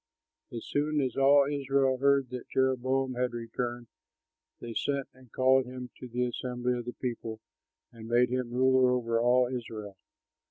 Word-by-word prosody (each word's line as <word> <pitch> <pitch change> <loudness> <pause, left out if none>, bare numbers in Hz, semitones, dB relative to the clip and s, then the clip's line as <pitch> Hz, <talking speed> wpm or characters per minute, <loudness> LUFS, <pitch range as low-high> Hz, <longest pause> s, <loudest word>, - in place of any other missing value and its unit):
As 115 -2 -6
soon 150 +1 0
as 130 -4 -1
all 140 +1 +5
Israel 135 -2 +1
heard 140 -2 +3
that 125 -1 -7
Jeroboam 130 0 +1
had 125 0 -1
returned, 120 +1 -4 0.7
they 120 -1 -7
sent 140 +2 -1
and 130 -3 -20
called 130 0 +3
him 125 -1 -8
to 125 - -8
the 125 +1 -1
assembly 125 0 -2
of 120 -1 -4
the 120 - -5
people 115 -3 -5 0.5
and 115 -1 -11
made 120 +1 +3
him 125 -1 -2
ruler 130 +1 +4
over 115 -2 0
all 125 +1 +4
Israel. 115 -5 -6
125 Hz, 160 wpm, -29 LUFS, 120-130 Hz, 0.7 s, all